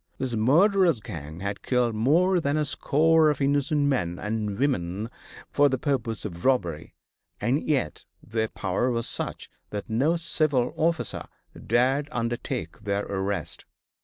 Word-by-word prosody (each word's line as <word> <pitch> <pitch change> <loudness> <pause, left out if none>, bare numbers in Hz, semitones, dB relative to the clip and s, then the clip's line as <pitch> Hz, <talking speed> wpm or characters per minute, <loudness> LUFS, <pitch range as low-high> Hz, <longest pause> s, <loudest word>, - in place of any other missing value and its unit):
This 130 -2 -3
murderous 170 - +4
gang 80 -6 -8
had 100 +1 -3
killed 125 -2 +1
more 165 - +3
than 145 -2 0
a 150 - +1
score 160 +3 +3
of 150 - 0
innocent 145 +1 +1
men 125 -12 0
and 105 0 -3
women 110 -5 -1 0.4
for 145 0 +4
the 130 - 0
purpose 120 -6 -1
of 85 -4 -7
robbery, 90 - 0 0.4
and 125 +8 +1
yet 135 - -1 0.2
their 110 0 -1
power 100 +5 -1
was 115 -1 0
such - - -2 0.2
that 105 +3 -6
no 145 +10 +2
civil 155 -6 +1
officer 160 -8 0 0.4
dared 135 +4 +2
undertake 115 - -3
their 100 -1 -2
arrest. 95 -3 -2
125 Hz, 140 wpm, -26 LUFS, 105-145 Hz, 0.4 s, murderous